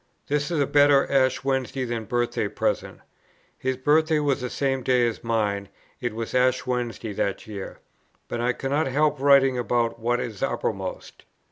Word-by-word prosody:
This 145 0 0
is 170 -3 -1
a 140 - +3
better 145 0 +5
Ash 130 -2 +2
Wednesday 130 -1 -1
than 115 -2 -3
birthday 120 +2 -1
present;" - - -2 0.5
[his 130 0 -2
birthday 155 +4 +3
was 145 -3 0
the 125 - -3
same 135 0 -1
day 125 -1 +3
as 115 - -5
mine; 105 -4 -1 0.3
it 120 -4 -3
was 115 0 -5
Ash 130 0 +2
Wednesday 120 -3 -3
that 100 0 -2
year;] 100 -3 -7 0.5
"but 120 - -3
I 120 +1 +2
cannot 140 +4 -1
help 150 +2 +1
writing 135 -2 +5
about 120 -1 0
what 120 +2 0
is 110 -5 -5
uppermost. - - -3
125 Hz, 165 wpm, -25 LUFS, 115-140 Hz, 0.5 s, better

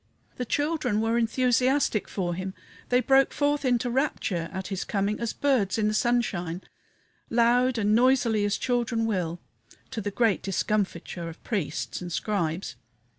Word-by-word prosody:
The 250 - -2
children 290 -5 0
were 225 +1 +1
enthusiastic 250 0 +2
for 175 -3 -2
him, 185 +2 -5 0.3
they 250 0 +4
broke 270 +1 +4
forth 290 0 0
into 245 -1 +1
rapture 210 - -1
at 190 0 -5
his 195 -2 -2
coming 205 +1 -1
as 235 -2 -1
birds 255 -10 +1
in 215 -1 +2
the 215 - 0
sunshine, 200 -7 0 0.7
loud 245 +2 +3
and 210 -1 +2
noisily 240 -3 +3
as 205 0 +1
children 240 -2 0
will, 175 -6 -1 0.5
to 220 - -3
the 205 - -2
great 220 0 +1
discomfiture 190 -3 -2
of 165 - -12
priests 185 -10 -3
and 175 -1 -6
Scribes. 170 - -2
220 Hz, 150 wpm, -27 LUFS, 190-245 Hz, 0.7 s, they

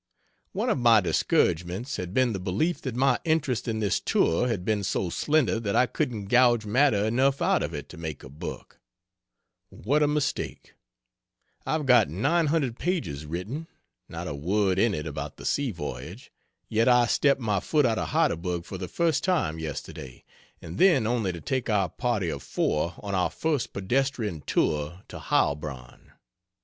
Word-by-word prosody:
One - - 0
of - - 0
my 115 -2 +6
discouragements 90 - 0
had 90 -1 -5
been 125 +2 +2
the 95 - -3
belief 100 - -1
that 130 -4 -4
my 135 +2 +2
interest 155 -8 0
in 110 -1 -1
this 105 -3 +1
tour 85 +10 +1
had 105 -7 -2
been 105 -1 0
so 95 -2 -1
slender 145 - +1
that 100 -3 -2
I 125 - +5
couldn't 115 -4 -3
gouge 120 0 +4
matter 105 -2 +3
enough 130 +5 +2
out 185 +2 +2
of 80 - -3
it 75 -1 -6
to 90 - -11
make 80 -3 -6
a 70 - -10
book. 70 +3 -8 0.9
What 145 - 0
a 150 - +4
mistake. 150 -1 -2 0.9
I've 155 -2 0
got 125 - +5
900 145 - +1
pages 115 - -2
written 105 - -5 0.4
(not - - -6
a - - -3
word 95 +6 0
in 110 -2 +3
it 75 - -4
about 75 - -6
the - - -10
sea 145 -2 0
voyage) 85 -8 -7 0.4
yet 115 +2 +1
I 125 -1 +5
stepped 140 +3 +2
my 105 -5 0
foot 150 - +1
out 115 -2 +1
of - - -2
Heidelberg 85 0 0
for 95 - -7
the 90 - -4
first 165 - 0
time 160 - 0
yesterday, 70 -4 -7 0.4
and 85 +4 -7
then 165 - +5
only 115 -4 0
to 85 -2 -8
take 130 -3 -2
our 100 -4 +2
party 115 -4 -1
of - - -4
four 85 +3 -1
on 100 -1 -4
our 90 -1 +1
first 155 -6 -1
pedestrian 110 - -1
tour 75 +5 0
to - - -8
Heilbronn. 70 -4 -2
110 Hz, 175 wpm, -26 LUFS, 90-135 Hz, 0.9 s, my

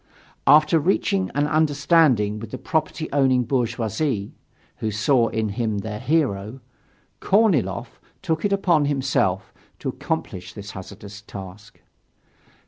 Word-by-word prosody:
After 150 +3 +6
reaching 190 +3 +1
an 145 +1 +2
understanding 145 -8 +3
with 115 -1 -8
the - - -6
property 160 -1 -2
owning 130 -3 +3
bourgeoisie 120 -2 -1 0.5
who 110 - -2
saw 115 +3 +2
in 110 -1 -2
him 110 0 -2
their 105 +1 -5
hero 130 -7 0 0.6
Korniloff 130 - +1 0.2
took 160 -4 -1
it 205 - +1
upon 175 -6 +2
himself 130 -9 0 0.2
to - - -4
accomplish 90 0 -4
this 100 0 -8
hazardous 100 +2 -10
task. 100 0 -11
125 Hz, 120 wpm, -23 LUFS, 105-155 Hz, 0.6 s, After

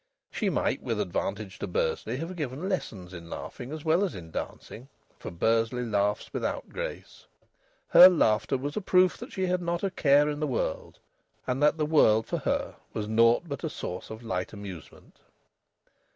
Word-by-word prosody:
She - - -1
might, - - 0
with - - -2
advantage - - -3
to - - -3
Bursley, 480 - -1
have 165 +5 -5
given 150 +2 -4
lessons 95 - -4
in 85 -2 -9
laughing 125 +8 -7
as 155 0 -7
well 165 +5 +3
as 195 - -2
in 80 -3 -9
dancing, 120 +9 -7 0.3
for - - -6
Bursley 115 +7 +1
laughs 105 -2 -1
without - - -3
grace. - - -7 0.6
Her 180 - +10
laughter 135 -6 +2
was 145 +3 -4
a 215 - -1
proof 185 -1 +4
that - - -8
she 190 - -1
had 180 0 0
not 170 +1 -2
a 195 - 0
care 145 -3 +4
in 150 0 -2
the 155 - 0
world, 130 - -3 0.5
and 130 +2 -1
that 150 +2 +4
the 155 - +1
world 110 -8 +4
for - - -2
her - - -2 0.2
was 105 -1 -3
naught 115 +8 +4
but 140 -3 -6
a 160 - -1
source 90 - -6
of 110 +2 -8
light 100 -4 -3
amusement. 100 -6 -10
135 Hz, 180 wpm, -28 LUFS, 110-170 Hz, 0.6 s, Her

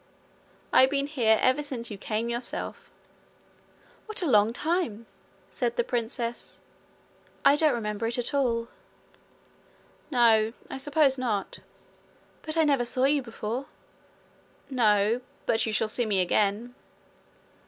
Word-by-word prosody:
'I've 260 - +6
been 280 0 0
here 240 -7 +2
ever 260 +3 +3
since 255 -6 -6
you 205 - -6
came 220 +3 -2
yourself.' 235 +1 -5 1.2
'What 430 -3 -2
a - - 0
long 215 -4 +4
time!' 300 - -2 0.4
said 470 - -2
the 480 - +1
princess. 235 - -3 0.9
'I 285 - +6
don't 300 -4 +3
remember 210 -1 -3
it 235 - -2
at 245 +3 -2
all.' 235 -4 0 1.4
'No. 225 -4 +4 0.2
I - - -4
suppose 280 -1 +2
not.' 215 -6 -2 0.8
'But 310 +1 -4
I 325 - +5
never 280 -5 +2
saw 255 +2 -1
you 280 +1 +3
before.' 235 +2 -5 1.0
'No. 220 -1 +2 0.2
But 225 - +2
you - - -1
shall 215 0 +1
see 230 +2 -1
me 200 -3 +1
again.' 205 +6 +1
240 Hz, 130 wpm, -27 LUFS, 220-275 Hz, 1.4 s, I've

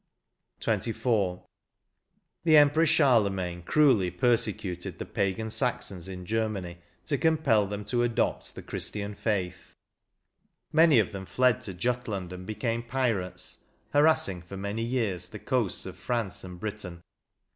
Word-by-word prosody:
48 115 - 0
XXIV. 100 -7 0 1.0
The 160 -2 +6
Emperor 150 +3 +5
Charlemagne 100 - +2
cruelly 120 - +4
persecuted 100 -2 0
the - - -5
pagan 100 +3 -1
Saxons 125 -8 -1
in 90 -1 -7
Germany 105 -5 -2 0.3
to 140 -3 -1
compel 145 -11 +3
them 105 +1 -5
to 120 +3 0
adopt 120 -1 -1
the - - -8
Christian 105 0 -4
faith; 95 -4 -3 1.0
many 160 -3 +6
of 110 -1 +3
them 95 -2 -7
fled 125 -3 +2
to 95 - -6
Jutland 105 -4 -2
and 90 0 -9
became 115 +2 -2
pirates, 115 -6 -2 0.3
harassing 145 - +3
for 90 +3 -9
many 100 +3 -3
years 110 -8 -1
the 105 - -8
coasts 120 -3 0
of 95 -1 -8
France 115 -1 -3
and 90 -1 -9
Britain. 100 -5 -6
105 Hz, 135 wpm, -28 LUFS, 95-125 Hz, 1.0 s, The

